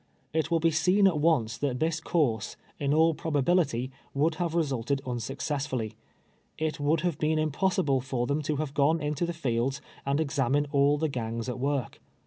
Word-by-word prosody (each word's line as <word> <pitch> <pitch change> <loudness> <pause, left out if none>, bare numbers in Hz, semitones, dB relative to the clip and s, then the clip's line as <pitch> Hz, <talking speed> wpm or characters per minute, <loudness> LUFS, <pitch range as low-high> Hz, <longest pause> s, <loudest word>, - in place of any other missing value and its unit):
It 160 -2 +1
Avill 165 -1 0
he 165 - +4
seen 180 +6 +3
at 175 -6 +3
once 125 -8 +2
that 135 -4 -1
tliis 160 +2 -1
course, 120 - 0 0.2
in 140 -1 0
all 160 +2 +4
proh 160 0 -4
ahility, 135 -5 +1 0.2
would 155 +4 +2
have 170 -1 -1
resulted 140 -4 0
unsuccessfully. 125 -1 -3 0.6
It 155 -1 -2
would 150 +2 +2
have 175 -4 -1
been 155 +1 +1
impossible 155 -2 +1
fur 125 -1 -2
them 145 +4 0
to 150 +1 -1
have 145 -1 -3
gone 150 +4 +3
into 150 +2 -1
tlie 170 - -3
fields 130 -2 -1 0.2
and 140 +2 0
examine 145 -2 +1
all 140 0 +4
the 160 +2 0
gangs 115 -4 -3
at 125 - -4
v.'ork. 140 -1 -2
145 Hz, 180 wpm, -28 LUFS, 130-160 Hz, 0.6 s, he